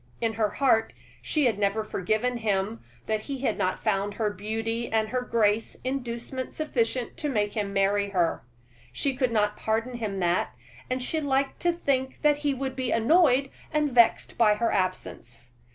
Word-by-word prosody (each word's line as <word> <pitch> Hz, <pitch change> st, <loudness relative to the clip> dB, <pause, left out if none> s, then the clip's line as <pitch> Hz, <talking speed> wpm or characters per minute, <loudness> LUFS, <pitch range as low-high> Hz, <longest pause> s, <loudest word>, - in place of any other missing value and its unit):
In 225 Hz, -1 st, 0 dB
her 215 Hz, -1 st, +1 dB
heart 235 Hz, -4 st, +2 dB, 0.3 s
she 300 Hz, -3 st, +1 dB
had 225 Hz, -4 st, +1 dB
never 205 Hz, +2 st, +1 dB
forgiven 215 Hz, +5 st, -1 dB
him 215 Hz, 0 st, -1 dB, 0.2 s
that 215 Hz, -1 st, -1 dB
he 270 Hz, +2 st, -5 dB
had 230 Hz, -6 st, +1 dB
not 185 Hz, -, -1 dB
found 200 Hz, -1 st, 0 dB
her 215 Hz, -2 st, 0 dB
beauty 225 Hz, +3 st, -3 dB
and 220 Hz, -1 st, +1 dB
her 255 Hz, +1 st, -1 dB
grace 225 Hz, -3 st, +1 dB
inducement 255 Hz, 0 st, -4 dB
sufficient 250 Hz, -5 st, -1 dB
to 300 Hz, -3 st, -2 dB
make 210 Hz, -5 st, 0 dB
him 205 Hz, -2 st, -2 dB
marry 200 Hz, +1 st, +2 dB
her. 175 Hz, -4 st, +1 dB, 0.5 s
She 270 Hz, -, -1 dB
could 250 Hz, -2 st, +1 dB
not 210 Hz, -2 st, +1 dB
pardon 230 Hz, +3 st, -1 dB
him 205 Hz, -4 st, -3 dB
that, 175 Hz, 0 st, 0 dB, 0.3 s
and 255 Hz, 0 st, -1 dB
she 315 Hz, +5 st, -1 dB
liked 275 Hz, -1 st, 0 dB
to 350 Hz, -, +2 dB
think 265 Hz, -6 st, -1 dB
that 295 Hz, -1 st, +4 dB
he 295 Hz, -1 st, 0 dB
would 265 Hz, 0 st, -3 dB
be 255 Hz, -2 st, -2 dB
annoyed 275 Hz, +1 st, +4 dB, 0.2 s
and 300 Hz, -2 st, +1 dB
vexed 235 Hz, -1 st, +3 dB
by 215 Hz, -3 st, +5 dB
her 230 Hz, +2 st, 0 dB
absence. 125 Hz, -, -3 dB
230 Hz, 175 wpm, -27 LUFS, 210-260 Hz, 0.5 s, by